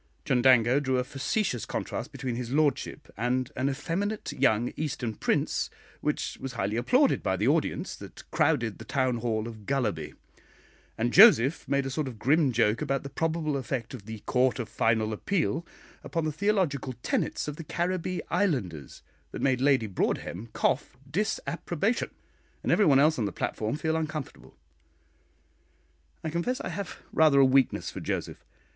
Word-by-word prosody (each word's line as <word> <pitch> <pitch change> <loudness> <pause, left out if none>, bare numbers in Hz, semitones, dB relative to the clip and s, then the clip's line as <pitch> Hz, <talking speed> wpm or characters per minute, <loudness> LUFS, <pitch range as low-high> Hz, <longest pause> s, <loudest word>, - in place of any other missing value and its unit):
Chundango 125 0 +4
drew 130 -2 +1
a 125 - +1
facetious 135 - -1
contrast - - -4
between 130 -2 -4
his 120 -1 -4
lordship 145 0 0
and 125 +3 -1
an 130 +2 0
effeminate 185 +10 -2
young 110 +3 +2
Eastern 130 -7 -3
prince, - - 0 0.3
which - - -2
was 135 -1 -5
highly 105 -2 -1
applauded 255 - +3
by - - 0
the - - +1
audience - - 0
that - - -11
crowded 145 -9 +1
the - - -7
town 130 -3 0
hall 110 -1 -1
of 110 -3 -10
Gullaby; 120 - -1 0.8
and 120 +2 0
Joseph 165 - +7
made 140 -1 +1
a 135 - -3
sort 150 +1 -2
of 120 -4 -7
grim 140 +4 +3
joke 105 +1 +2
about 135 -2 -1
the 140 - -7
probable 160 -2 -1
effect 130 -3 -3
of 110 -5 -9
the 110 -1 -7
"Court 130 0 +2
of 120 -4 -3
Final 110 -1 +1
Appeal" 170 - -1 0.4
upon 165 -2 -2
the 155 - 0
theological 165 -7 0
tenets - - -1
of 150 0 -5
the 165 - -6
Caribbee 180 +2 -2
Islanders, 100 - -1 0.3
that - - -6
made 130 -2 +2
Lady 135 -4 +3
Broadhem 100 +1 -2
cough 130 +2 0
disapprobation, 200 - -1 0.5
and - - 0
everybody 145 -10 +5
else 155 0 +3
on 110 - +1
the 100 - -2
platform 110 +4 -2
feel 160 +1 -1
uncomfortable. 155 -3 -5 1.7
I 160 - -2
confess 205 +11 -1
I - - -4
have 200 -4 -5 0.2
rather 155 -3 +5
a 135 - +7
weakness 130 -1 +2
for - - -7
Joseph. - - -4
135 Hz, 160 wpm, -28 LUFS, 120-160 Hz, 1.7 s, Joseph